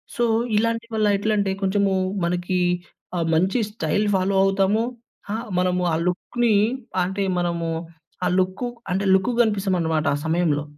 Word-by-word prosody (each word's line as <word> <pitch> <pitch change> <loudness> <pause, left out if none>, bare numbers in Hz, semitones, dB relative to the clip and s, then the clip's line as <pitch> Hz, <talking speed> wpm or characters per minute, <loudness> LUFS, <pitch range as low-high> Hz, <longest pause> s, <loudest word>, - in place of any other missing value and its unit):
So, 240 - +1 0.3
ఇలాంటి 230 +1 0
వల్ల 215 -1 +2
ఎట్లంటే, 205 -1 0
కొంచమూ 195 0 +1 0.3
మనకీ 180 +1 -1 0.6
ఆహ్, 170 - 0
మంచి 185 +8 +2
స్టైల్ 205 +1 0
ఫాలో 190 +1 +1
అవుతాము. 195 +3 +2 0.5
హా! 215 - -1 0.2
మనము 180 0 +1
ఆ - - +3
లుక్‌నీ 235 +6 0 0.5
అంటే, 190 +2 -2 0.2
మనము 170 -1 -1 0.6
ఆ - - +3
లుక్కు 185 +6 -1 0.2
అంటే, 195 - 0
లుక్కుగ 230 +6 +1
గనిపిస్తామనమాట 185 -7 0
ఆ - - -4
సమయంలో. 160 -3 +1
190 Hz, 135 wpm, -23 LUFS, 175-210 Hz, 0.6 s, ఆ